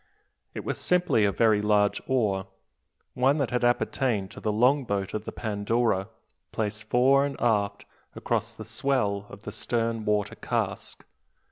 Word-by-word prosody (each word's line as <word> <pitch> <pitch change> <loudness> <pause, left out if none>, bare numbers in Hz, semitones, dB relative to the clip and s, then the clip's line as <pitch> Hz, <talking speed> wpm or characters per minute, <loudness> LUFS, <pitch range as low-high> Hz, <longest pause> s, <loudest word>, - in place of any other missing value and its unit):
It - - -5
was - - -3
simply 180 - +2
a 100 - +2
very 110 +1 +3
large 105 -1 +2
oar, 105 -7 0 0.7
one 135 +4 +2
that 140 -5 -1
had 125 0 0
appertained 120 -4 +1
to - - -9
the 110 - -1
longboat 115 -4 +1
of 110 0 -4
the - - -5
Pandora, 110 -1 0 0.4
placed 105 -1 -3
fore 135 +3 +4
and 140 -1 -3
aft 105 -3 0 0.3
across - - -1
the - - -10
swell 105 -8 -1
of 100 +2 -12
the 105 - -6
stern 115 0 -2
water 105 -1 0
cask. - - -3
110 Hz, 150 wpm, -27 LUFS, 105-125 Hz, 0.7 s, fore